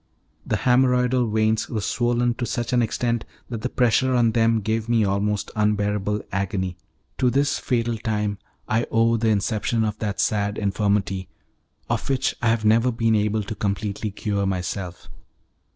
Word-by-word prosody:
The -, -, +1 dB
haemorrhoidal 125 Hz, -1 st, +2 dB
veins 110 Hz, 0 st, +1 dB
were 110 Hz, -, -2 dB
swollen 120 Hz, +3 st, +1 dB
to 120 Hz, -, 0 dB
such 120 Hz, 0 st, -2 dB
an 125 Hz, -, +4 dB
extent 120 Hz, 0 st, -1 dB, 0.3 s
that 115 Hz, -2 st, -4 dB
the 125 Hz, -, -2 dB
pressure 125 Hz, +1 st, +2 dB
on 120 Hz, -2 st, +3 dB
them 115 Hz, 0 st, +2 dB
gave 110 Hz, +2 st, -2 dB
me 115 Hz, -3 st, +3 dB
almost 100 Hz, +1 st, -1 dB
unbearable 105 Hz, -1 st, 0 dB
agony. 95 Hz, -1 st, -2 dB, 0.4 s
To 125 Hz, -, +4 dB
this 140 Hz, +3 st, +1 dB
fatal 120 Hz, -2 st, -1 dB
time 105 Hz, -2 st, -2 dB, 0.3 s
I 115 Hz, +2 st, 0 dB
owe 115 Hz, +1 st, +3 dB
the 115 Hz, 0 st, +1 dB
inception 110 Hz, +2 st, 0 dB
of 105 Hz, -1 st, -2 dB
that 105 Hz, -2 st, -3 dB
sad 105 Hz, -1 st, 0 dB
infirmity 100 Hz, -2 st, 0 dB, 0.6 s
of -, -, -2 dB
which 135 Hz, -1 st, +1 dB
I 120 Hz, -, +1 dB
have 115 Hz, -1 st, +1 dB
never 115 Hz, +3 st, +4 dB
been 115 Hz, -1 st, +1 dB
able 105 Hz, 0 st, +1 dB
to 100 Hz, -, -5 dB
completely 105 Hz, +1 st, -2 dB
cure 100 Hz, -1 st, -2 dB
myself. 90 Hz, -1 st, -4 dB
110 Hz, 160 wpm, -23 LUFS, 105-120 Hz, 0.6 s, an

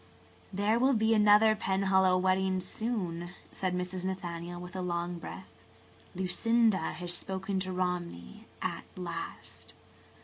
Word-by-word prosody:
" -, -, -28 dB
"There 205 Hz, +4 st, +2 dB
will 260 Hz, +1 st, +4 dB
be 220 Hz, 0 st, +3 dB
another 210 Hz, +1 st, +6 dB
Penhallow 190 Hz, -2 st, +3 dB
wedding 185 Hz, 0 st, +2 dB
soon," 185 Hz, -4 st, -3 dB, 0.2 s
said 185 Hz, -1 st, -1 dB
Mrs. 180 Hz, 0 st, -3 dB
Nathaniel, 175 Hz, -2 st, -4 dB
with 180 Hz, +1 st, -9 dB
a 185 Hz, -, -2 dB
long 175 Hz, -1 st, -2 dB
breath. 95 Hz, -, -8 dB, 0.7 s
"Lucinda 195 Hz, +1 st, +2 dB
has 175 Hz, +2 st, -3 dB
spoken 190 Hz, +1 st, -2 dB
to 185 Hz, 0 st, -3 dB
Romney 175 Hz, -, -3 dB, 0.2 s
at -, -, -3 dB
last. 170 Hz, -2 st, -7 dB
185 Hz, 130 wpm, -31 LUFS, 175-200 Hz, 0.7 s, another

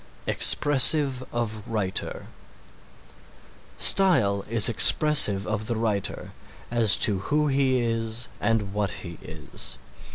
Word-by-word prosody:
EXPRESSIVE 140 Hz, -2 st, +3 dB
OF 110 Hz, -2 st, -5 dB
WRITER 100 Hz, -4 st, -5 dB, 1.5 s
Style 120 Hz, -, +2 dB
is 115 Hz, -3 st, +4 dB
expressive 115 Hz, -4 st, +3 dB
of 110 Hz, 0 st, -5 dB
the 120 Hz, -, -4 dB
writer, 110 Hz, -3 st, -5 dB, 0.4 s
as 115 Hz, -4 st, +3 dB
to 100 Hz, -3 st, 0 dB
who 150 Hz, +10 st, -3 dB
he 135 Hz, -1 st, -1 dB
is 115 Hz, 0 st, -5 dB
and 105 Hz, -2 st, -3 dB
what 105 Hz, -1 st, -3 dB
he 85 Hz, -2 st, -9 dB
is. -, -, -5 dB
115 Hz, 105 wpm, -23 LUFS, 105-130 Hz, 1.5 s, is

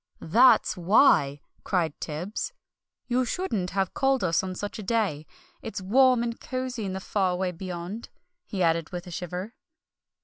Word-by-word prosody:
"That's 245 Hz, +10 st, +5 dB
why!" 170 Hz, -, +4 dB, 0.2 s
cried 170 Hz, -6 st, 0 dB
Tibbs. 175 Hz, -, -4 dB, 0.5 s
"You 250 Hz, +1 st, +1 dB
shouldn't 230 Hz, -, -2 dB
have 195 Hz, -1 st, -1 dB
called 270 Hz, -3 st, +1 dB
us 165 Hz, -3 st, +2 dB
on 185 Hz, -1 st, -5 dB
such 205 Hz, +3 st, -5 dB
a -, -, -4 dB
day! 195 Hz, -8 st, -1 dB, 0.3 s
It's 220 Hz, -2 st, -5 dB
warm 245 Hz, +5 st, +4 dB
and 235 Hz, -1 st, -3 dB
cosy 255 Hz, -4 st, -4 dB
in 190 Hz, -, -3 dB
the 190 Hz, -, -3 dB
Far 190 Hz, -1 st, 0 dB
away 180 Hz, 0 st, -1 dB
Beyond," 180 Hz, +4 st, -6 dB, 0.3 s
he 190 Hz, -4 st, -2 dB
added, 165 Hz, -1 st, +1 dB
with 175 Hz, -1 st, -6 dB
a 180 Hz, -, -9 dB
shiver. 180 Hz, +5 st, -5 dB
190 Hz, 160 wpm, -27 LUFS, 175-230 Hz, 0.5 s, That's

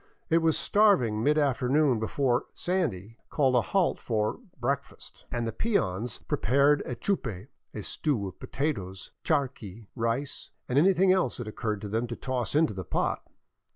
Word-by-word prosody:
It 165 Hz, -, +5 dB
was 160 Hz, -1 st, +2 dB
starving 140 Hz, -, +3 dB
mid 150 Hz, +3 st, +3 dB
afternoon 140 Hz, -2 st, +2 dB
before 125 Hz, +2 st, 0 dB
" -, -, -46 dB
Sandy 115 Hz, -, -1 dB
'* -, -, -46 dB
called 135 Hz, -4 st, +2 dB
a 125 Hz, -, +4 dB
halt 190 Hz, -, +1 dB
for 110 Hz, -2 st, -1 dB
" 165 Hz, -, -34 dB
breakfast,'* 140 Hz, +3 st, -4 dB
and 120 Hz, -1 st, -1 dB
the 115 Hz, -, -2 dB
peons 115 Hz, -, -1 dB
prepared 140 Hz, +4 st, +2 dB
a 125 Hz, -, -3 dB
chupe, 120 Hz, -, -3 dB
— -, -, -53 dB
a -, -, -6 dB
stew 120 Hz, -10 st, -1 dB
of 95 Hz, -, -10 dB
potatoes, 100 Hz, -10 st, -3 dB
charqui, 115 Hz, -, -2 dB
rice, 115 Hz, +4 st, -2 dB, 0.2 s
and 130 Hz, +3 st, +3 dB
anything 185 Hz, +2 st, +5 dB
else 180 Hz, -10 st, 0 dB
that 120 Hz, -, -5 dB
it 110 Hz, -, -6 dB
occurred 105 Hz, -2 st, -3 dB
to 105 Hz, -, -5 dB
them 115 Hz, +4 st, -1 dB
to 120 Hz, -, -5 dB
toss 130 Hz, 0 st, -3 dB
into 155 Hz, -6 st, +3 dB
the 95 Hz, -1 st, -5 dB
pot. -, -, -1 dB
125 Hz, 180 wpm, -28 LUFS, 110-150 Hz, 0.2 s, It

